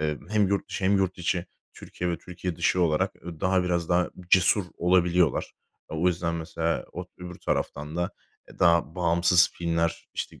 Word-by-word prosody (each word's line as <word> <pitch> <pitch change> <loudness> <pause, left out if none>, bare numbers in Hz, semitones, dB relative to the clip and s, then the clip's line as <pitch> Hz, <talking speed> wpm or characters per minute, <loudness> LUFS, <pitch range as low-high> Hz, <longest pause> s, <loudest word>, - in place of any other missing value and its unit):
eee, 75 -1 -1
hem 105 -2 +2
yurt 100 -1 -1
dışı 95 - -4
hem 100 +1 +4
yurt 95 -1 0
içi, 90 0 -1 0.3
Türkiye 90 0 -4
ve 85 - -2
Türkiye 90 -1 -6
dışı 90 - +1
olarak, 75 -2 +1
ııı, 85 -3 -8
daha 95 0 +2
biraz 85 -2 -1
daha 90 0 +2 0.2
cesur 95 +2 +5
olabiliyorlar. 90 -3 +2 0.4
O 80 +3 +1
yüzden 85 -1 -1
mesela 85 0 -2
o 90 +1 -6
öbür 90 0 -8
taraftan 75 +3 -3
da, 90 +2 -1 0.4
eee, - - -16
daha 85 -3 +3
bağımsız 85 0 +4
filmler, 85 -1 -1
işte, - - -5
85 Hz, 175 wpm, -26 LUFS, 85-90 Hz, 0.4 s, cesur